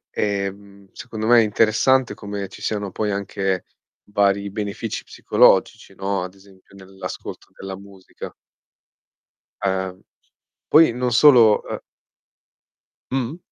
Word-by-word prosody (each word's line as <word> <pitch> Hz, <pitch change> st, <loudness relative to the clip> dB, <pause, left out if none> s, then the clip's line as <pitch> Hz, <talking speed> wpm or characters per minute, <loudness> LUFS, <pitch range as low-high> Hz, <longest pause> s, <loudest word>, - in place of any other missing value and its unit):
è, 100 Hz, -2 st, -1 dB
mhmm, 100 Hz, 0 st, -17 dB
secondo 110 Hz, 0 st, -5 dB
me 120 Hz, -2 st, +6 dB
interessante 115 Hz, +5 st, +2 dB
come 100 Hz, -1 st, -6 dB
ci -, -, -13 dB
siano 105 Hz, -2 st, -3 dB
poi 105 Hz, +2 st, -2 dB
anche 95 Hz, -2 st, -2 dB, 0.4 s
vari 100 Hz, 0 st, +1 dB
benefici 105 Hz, +2 st, -4 dB
psicologici, -, -, +2 dB
no, 95 Hz, -1 st, -2 dB
ad 90 Hz, +1 st, -9 dB
esempio 95 Hz, 0 st, -21 dB
nell'ascolto 95 Hz, -1 st, -9 dB
della 95 Hz, -1 st, -7 dB
musica. 100 Hz, -1 st, -11 dB, 1.3 s
Uhm. 95 Hz, -1 st, -2 dB, 0.7 s
Poi 155 Hz, -4 st, +6 dB
non 125 Hz, +1 st, -1 dB
solo, 120 Hz, -5 st, +6 dB
uhm -, -, -4 dB, 1.3 s
Mh-mh. 135 Hz, +4 st, -2 dB
100 Hz, 110 wpm, -22 LUFS, 95-110 Hz, 1.3 s, me